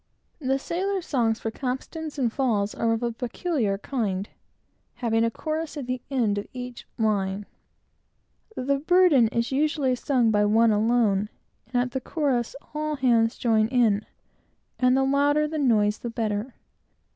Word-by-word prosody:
The 270 Hz, -2 st, 0 dB
sailor's 370 Hz, +5 st, -2 dB
songs 230 Hz, -5 st, +1 dB
for 225 Hz, -, -3 dB
capstans 285 Hz, +6 st, -5 dB
and 240 Hz, -5 st, 0 dB
falls 215 Hz, -7 st, 0 dB
are 230 Hz, -, 0 dB
of 225 Hz, +1 st, -1 dB
a 235 Hz, -, 0 dB
peculiar 240 Hz, -, -2 dB
kind, 205 Hz, -4 st, -2 dB, 0.7 s
having 225 Hz, -2 st, +1 dB
a 230 Hz, -, +2 dB
chorus 310 Hz, +5 st, -4 dB
at 280 Hz, -, -4 dB
the 255 Hz, 0 st, -3 dB
end 225 Hz, -7 st, +1 dB
of 205 Hz, -, -7 dB
each 250 Hz, -1 st, -7 dB
line. 205 Hz, -2 st, 0 dB, 1.1 s
The 275 Hz, +2 st, 0 dB
burden 325 Hz, -6 st, +5 dB
is 235 Hz, +2 st, -1 dB
usually 285 Hz, -1 st, +1 dB
sung, 245 Hz, -2 st, +1 dB
by 210 Hz, -1 st, +3 dB
one 225 Hz, +2 st, +4 dB
alone, 210 Hz, -2 st, +2 dB, 0.4 s
and, 240 Hz, -, -12 dB
at 250 Hz, -, -5 dB
the 265 Hz, -, -3 dB
chorus, 260 Hz, -5 st, -1 dB, 0.2 s
all 305 Hz, 0 st, -2 dB
hands 235 Hz, -4 st, +2 dB
join 220 Hz, -2 st, +2 dB
in, 225 Hz, -4 st, +2 dB, 0.8 s
and 255 Hz, 0 st, +4 dB
the 270 Hz, -, +3 dB
louder 285 Hz, +2 st, +2 dB
the 310 Hz, 0 st, -3 dB
noise, 215 Hz, -6 st, +2 dB
the 240 Hz, -, -5 dB
better. 225 Hz, +1 st, -3 dB
245 Hz, 155 wpm, -25 LUFS, 220-280 Hz, 1.1 s, burden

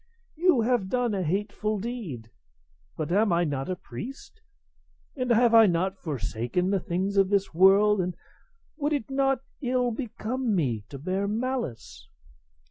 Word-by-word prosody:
You 330 Hz, -6 st, +3 dB
have 225 Hz, -4 st, +1 dB
done 245 Hz, -2 st, 0 dB
a 195 Hz, -, -1 dB
hateful 210 Hz, +5 st, -1 dB
deed; 190 Hz, -, -6 dB, 0.7 s
but 155 Hz, 0 st, -3 dB
am 205 Hz, +2 st, +3 dB
I 170 Hz, 0 st, +3 dB
not 140 Hz, -3 st, -2 dB
a 185 Hz, -, -1 dB
priest, 250 Hz, -, -9 dB, 0.7 s
and 255 Hz, -3 st, -2 dB
have 235 Hz, 0 st, +4 dB
I 225 Hz, -1 st, +8 dB
not 185 Hz, +2 st, 0 dB
forsaken 130 Hz, -, -2 dB
the 195 Hz, -, +2 dB
things 190 Hz, +4 st, -2 dB
of 195 Hz, -1 st, +4 dB
this 200 Hz, -3 st, +1 dB
world, 195 Hz, +3 st, +5 dB
and 180 Hz, 0 st, -3 dB, 0.6 s
would 295 Hz, 0 st, 0 dB
it 275 Hz, -3 st, -3 dB
not 270 Hz, -1 st, +1 dB, 0.2 s
ill 250 Hz, -2 st, +1 dB
become 235 Hz, 0 st, -2 dB
me 120 Hz, -, -1 dB
to 140 Hz, -, -7 dB
bear 185 Hz, +7 st, -2 dB
malice? 235 Hz, -, -4 dB
200 Hz, 150 wpm, -27 LUFS, 175-245 Hz, 0.7 s, I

